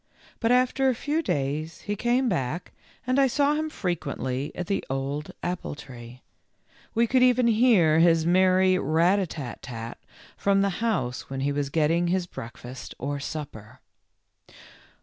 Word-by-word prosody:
But 225 - +1
after 255 +2 +3
a 255 - +1
few 295 +6 -1
days 150 - -2
he 205 - -3
came 245 +4 +1
back 165 - -2 0.3
and 255 +2 +2
I 270 - +5
saw 285 +3 +2
him 310 +1 -1
frequently 145 - -3
at 180 - -3
the 195 +3 -1
old 135 +3 -3
apple 175 -4 -3
tree; 125 -3 -11 0.7
we 230 +1 +4
could 255 +2 +2
even 250 -1 +4
hear 215 -9 +4
his 165 -1 +4
merry 185 +1 +4
rat 170 +7 +3
a 190 - -1
tat 140 -6 -7
tat 115 -1 -7 0.4
from 200 0 +2
the 200 - +2
house 130 - -1
when 135 0 -4
he 140 +1 0
was 140 -1 -2
getting 165 +3 +2
his 180 +1 0
breakfast 125 -3 -9
or 140 +2 -3
supper. 140 -8 -7
170 Hz, 155 wpm, -26 LUFS, 140-225 Hz, 0.7 s, I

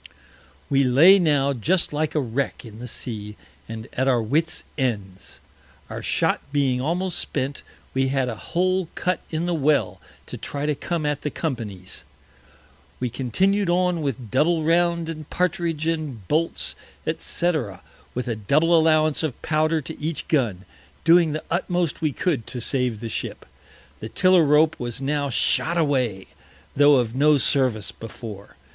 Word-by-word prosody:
We 140 0 +3
lay 155 +10 +7
now 145 -5 +2
just 165 - 0
like 155 +1 -1
a - - +3
Wreck 130 0 -2
in 110 -1 -11
the 125 - -6
Sea, 105 -3 -5 0.3
and 110 0 -6
at 130 +1 0
our 125 -3 +3
Wits 150 +9 0
Ends. 100 -9 -3 0.5
Our - - -5
Shot - - +1
being 135 -3 +1
almost 175 +5 -1
spent, 140 0 -3 0.3
we 135 0 +1
had 135 -1 0
a 120 - -2
Hole 185 - -1
cut 180 0 0
in 160 +1 -2
the 175 - 0
Well 135 - +1 0.2
to - - -7
try 145 0 -4
to 150 - +1
come 165 +2 -3
at 150 -1 -1
the 150 - -2
Company's. 105 - -4 1.0
We 125 -2 -2
continued 190 - +1
on 180 -1 +2
with 130 -6 -4
Double 160 +5 +2
round 170 0 +2
and 155 -2 -7
Partridge, 170 -3 -1
and 150 - -3
Bolts, 165 +2 0 0.3
&c. 175 +1 0 0.6
with 125 0 -3
a 115 - -1
Double 150 +11 +3
Allowance 155 -2 +4
of 155 -6 -3
Powder 155 0 +1
to 160 +3 -9
each 155 +1 -3
Gun, 110 - 0 0.4
doing 165 -1 +5
the 155 - -4
utmost 175 -2 -1
we 155 -2 +1
could 140 -4 -1
to 125 - -5
save 125 -3 -1
the 115 - -4
Ship. - - -5 0.5
The 110 - -6
Tiller 185 - +4
rope 150 +2 +4
was 120 -1 -3
now 140 +1 -1
shot 165 +6 +2
away, 130 - 0 0.5
tho' 145 +1 +6
of 120 -3 +1
no 145 +3 +4
Service 130 -6 +1
before. 110 -2 -10
145 Hz, 160 wpm, -23 LUFS, 125-165 Hz, 1.0 s, lay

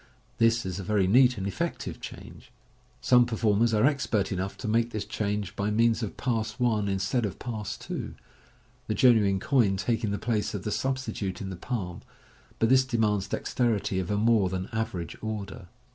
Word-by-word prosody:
This 115 -1 +3
is 95 0 -4
a - - -4
very 100 0 +2
neat 125 +5 +5
and 95 - -3
effective 100 - -3
change. - - -10 0.5
Some 125 -1 +5
performers 110 0 +2
are 110 +2 +3
expert 120 -9 +1
enough 95 +1 -3
to - - -6
make 115 +2 +2
this 110 -3 -4
change 105 -2 -3
by 100 +1 -1
means 115 +2 +2
of 110 - -4
Pass 110 -3 -1
1 115 -4 +1
instead 100 +6 0
of 100 -4 -3
Pass 110 -4 -5
2, - - -6 0.7
the - - -1
genuine 105 -6 +4
coin 110 -6 +2
taking 115 +1 -1
the 100 - -1
place 110 -2 -1
of 95 - -5
the 105 - -3
substitute 130 -7 -2
in 95 -1 -5
the - - -5
palm 90 -3 -4 0.3
} - - -29
but 115 - +2
this 130 0 +6
demands 110 -6 0
dexterity 105 -4 0
of 90 - -3
a 105 - +1
more 110 -3 +3
than 95 +1 -4
average 110 -7 -3
order. 105 -2 -5
105 Hz, 185 wpm, -27 LUFS, 100-115 Hz, 0.7 s, this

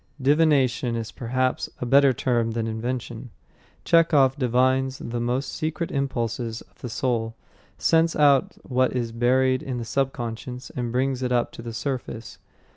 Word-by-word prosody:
Divination 135 -4 +2
is 115 -1 -4
perhaps 130 +2 -1
a - - -3
better 140 +2 +5
term 120 -2 0
than 115 -1 -1
invention. 120 +1 -4 0.6
Chekhov 150 -6 +4
divines 130 0 +1
the 120 +1 -4
most 125 +3 -1
secret 160 +2 -3
impulses 120 -4 -2
of - - -21
the 125 - -5
soul, 115 -1 -1 0.4
scents 165 0 +3
out 140 -3 +4
what 130 0 +1
is 120 -2 -1
buried 130 +2 +2
in 130 -2 -4
the 120 - -4
subconscious, 125 0 -3
and 120 -2 -3
brings 130 +1 0
it 125 -1 -1
up 120 -1 +1
to - - -10
the 115 0 -6
surface. 120 -2 -5
125 Hz, 150 wpm, -24 LUFS, 120-135 Hz, 0.6 s, better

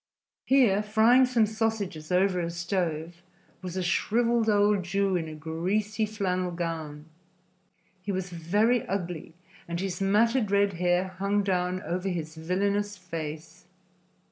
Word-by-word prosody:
Here, 245 -7 +4
frying 225 +5 +4
some 240 -3 +3
sausages 215 -7 -2
over 180 0 +2
a 170 -1 -2
stove, 170 -1 -3 0.4
was 185 0 -6
a 185 - -1
shriveled 230 +5 +1
old 205 -1 +3
Jew 195 +2 0
in 165 -2 -1
a 155 - -7
greasy 195 +8 -1
flannel 185 -4 -1
gown. 165 -4 -5 1.0
He 200 +2 -3
was 190 -1 -3
very 205 +8 +1
ugly 175 -4 -4 0.3
and 170 0 -3
his 190 -1 -3
matted 215 +3 +2
red 200 0 +2
hair 180 +1 +1
hung 200 +1 +1
down 185 0 -1
over 185 +2 -2
his 160 -3 -4
villainous 200 +5 -1
face. 165 -1 -7
185 Hz, 135 wpm, -27 LUFS, 170-205 Hz, 1.0 s, Here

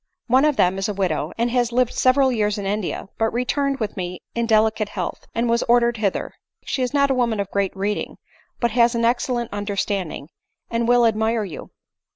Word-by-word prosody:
One 260 +4 +4
of 300 -2 +2
them 185 -2 +2
is 195 - -1
a 205 - -3
widow, 170 -5 -1
and 235 +1 0
has 245 -1 +1
lived 250 0 +1
several 260 +1 +3
years 210 -3 0
in 200 - -4
India, 195 -1 -3
but 225 0 +2
returned 275 +3 -1
with 215 -3 -3
me 180 -1 -5
in 235 0 -1
delicate 215 -1 +2
health, - - -5
and 235 +1 +1
was 235 0 +2
ordered 240 0 +4
hither: 205 -3 -2 0.3
she 265 - -2
is 250 -1 0
not 280 -1 +2
a - - +4
woman 235 -4 0
of 200 -1 -3
great 195 -1 -1
reading, 205 +2 -2 0.4
but 235 -2 +1
has 235 +1 +3
an 230 0 +1
excellent 240 -1 0
understanding, 200 -6 -3 0.4
and 230 0 0
will 245 0 +5
admire 220 0 +1
you. 185 -6 -8
230 Hz, 200 wpm, -22 LUFS, 205-245 Hz, 0.4 s, will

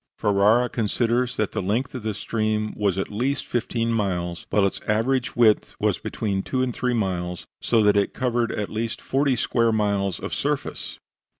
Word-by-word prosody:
Ferara 105 +4 +3
considers 120 +2 0
that 110 - 0
the - - -2
length 110 +8 -1
of 130 - -5
the 110 -1 -3
stream 110 0 -1
was 100 -3 0
at 95 - -2
least 130 +6 -1
fifteen 115 -1 -1
miles, 90 -5 -2
while 105 -2 +3
its 100 - -2
average 125 +4 +1
width 110 -3 +3
was - - +1
between 100 -3 -2
two 130 +5 -1
and 125 -2 -2
three 125 -1 0
miles, 90 -5 -2 0.2
so 115 -2 +3
that 105 -1 +4
it 100 -1 +2
covered 120 -2 0
at 105 - -3
least 110 +1 -3
forty 135 0 +1
square 115 0 +2
miles 100 -4 0
of - - -5
surface. - - -2
110 Hz, 180 wpm, -24 LUFS, 100-120 Hz, 0.2 s, that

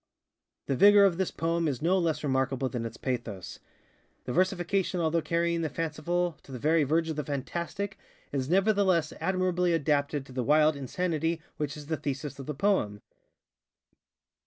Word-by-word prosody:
The 135 - 0
vigor 205 +6 +7
of 180 -4 +2
this 190 - +1
poem 165 0 -1
is 135 -5 -1
no 180 +4 +2
less 160 -3 0
remarkable 135 -1 0
than 120 -3 -3
its 115 - -11
pathos. 110 - -4 0.7
The 125 - -3
versification 185 +1 +1
although 165 0 +1
carrying 170 +1 0
the 160 - -1
fanciful 165 +1 -2
to - - -15
the 130 - -5
very 155 +5 +3
verge 160 +4 +1
of 155 - -5
the 150 - -1
fantastic, 170 +8 -4 0.3
is 135 -1 -2
nevertheless 190 -4 +3
admirably 180 -2 +1
adapted 145 -2 0
to 135 - -14
the 130 0 -2
wild 150 +4 +4
insanity 165 +3 -1 0.2
which 150 -1 -3
is 150 - -9
the 160 +1 -2
thesis 140 0 -4
of 135 - -8
the 150 - -3
poem. 130 - 0
155 Hz, 165 wpm, -29 LUFS, 140-175 Hz, 0.7 s, vigor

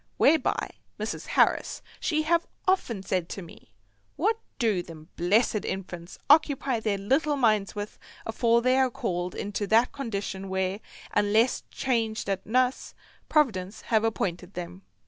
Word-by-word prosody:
Whereby 315 +2 +3 0.3
Mrs. - - -4
Harris - - +2 0.2
she 310 -2 0
have 335 +2 +2 0.2
often 240 - +1
said 180 -3 -1
to 195 - -6
me, 165 -9 -15 0.4
"What 435 +7 +1 0.2
do 220 -8 +2
them 160 -2 -12
blessed 210 +4 +2
infants 175 -2 -5
occupy 285 -4 +4
their 215 -2 0
little 270 +9 +1
minds 215 -7 +2
with 205 0 -6 0.3
afore 230 +1 +2
they 255 +1 +4
are 260 -1 +4
called 180 -5 -3
into 205 0 -3
that 230 +4 +4
condition 200 -7 -4
where, 190 +1 -1 0.3
unless 210 +4 +3
changed 225 -5 -1
at 195 - -3
nuss, 255 +3 +1 0.3
Providence 210 -10 +1
have 220 0 +5
appointed 190 -4 -2
them?" 170 - -6
215 Hz, 140 wpm, -27 LUFS, 190-255 Hz, 0.4 s, have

